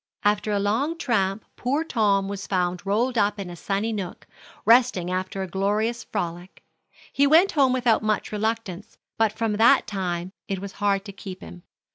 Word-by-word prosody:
After 210 +1 +1
a 205 - +1
long 230 +11 0
tramp 210 -8 0
poor 280 +6 -1
Tom 205 -9 +1
was 200 -1 -5
found 180 -2 -1
rolled 235 +4 +1
up 205 +1 +2
in 185 -3 -5
a - - -8
sunny 200 +6 -2
nook, 190 -4 -6 0.4
resting 230 -6 +4
after 185 +1 -2
a - - -5
glorious 210 +5 -1
frolic. 175 -2 -5 0.5
He 280 +1 +4
went 330 +7 +5
home 275 -5 +3
without 245 -3 +2
much 215 -1 -1
reluctance, 220 -1 -3 0.2
but 220 -2 +3
from 220 -1 -2
that 230 +2 +5
time 180 -2 -3 0.2
it 195 - -2
was 195 +1 -7
hard 200 -1 +1
to 200 - -7
keep 190 -1 -9
him. 175 - -11
205 Hz, 175 wpm, -24 LUFS, 190-230 Hz, 0.5 s, went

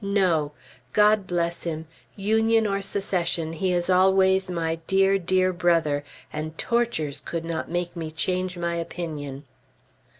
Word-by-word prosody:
No! 180 -7 +1 0.4
God 210 -2 +4
bless 170 -1 -1
him! 160 -1 -3 0.3
Union 220 +2 +2
or 200 -1 0
Secession, 175 -5 -1
he 185 +3 0
is 175 -1 +1
always 190 0 +4
my 165 -2 -1
dear, 195 0 +3
dear 185 +1 +2
Brother, 165 -5 +2 0.3
and 155 +1 -5
tortures 230 -12 -1
could 165 -1 -4
not 165 -1 -3
make 175 0 -2
me 165 -2 -4
change 180 +3 -1
my 170 0 -1
opinion. 155 -5 -5
175 Hz, 135 wpm, -25 LUFS, 165-195 Hz, 0.4 s, God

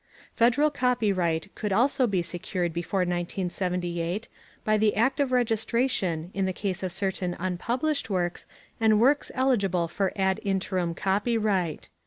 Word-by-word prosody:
Federal 245 +6 +3
copyright 200 - 0
could 210 - -3
also 255 +5 +3
be 190 -5 0
secured 175 0 -3
before 175 +3 -1
1978 175 +1 -2 0.4
by 215 -1 +3
the 215 0 +2
act 260 +6 +2
of 280 -3 +1
registration 225 -7 0
in 195 -1 0
the 190 - 0
case 190 -1 -3
of 185 -1 -2
certain 190 -2 -2
unpublished 235 - -1
works 175 -3 -2 0.3
and 220 -2 +4
works 275 +5 +3
eligible 200 -10 +2
for 190 +3 -1
ad 190 -1 +1
interim 185 -3 -1
copyright. 200 -4 0
195 Hz, 135 wpm, -27 LUFS, 180-230 Hz, 0.4 s, and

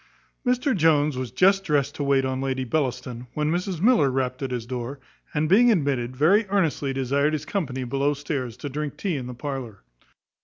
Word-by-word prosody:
Mr 250 +1 +1
Jones 155 -4 +3
was 130 -1 -3
just 195 - +3
dressed 145 -5 +1
to 145 - -4
wait 140 -1 +2
on 130 0 -2
Lady 130 -1 -1
Bellaston, 125 -2 -2
when 150 0 0
Mrs 180 0 -2
Miller 200 - +4
rapped 130 0 -2
at 135 - -2
his 120 -3 -3
door; 125 +3 -5 0.3
and, 150 +1 0
being 230 +8 +6
admitted, 135 - 0
very 195 - +4
earnestly 165 -8 +1
desired 140 +3 +1
his 155 - -2
company 135 -10 -2
below 140 +3 0
stairs, 140 -5 -4
to - - -6
drink 145 +1 -4
tea 190 -5 -1
in 130 -3 -4
the 125 - -7
parlour. 130 -6 -6
140 Hz, 190 wpm, -24 LUFS, 130-160 Hz, 0.3 s, being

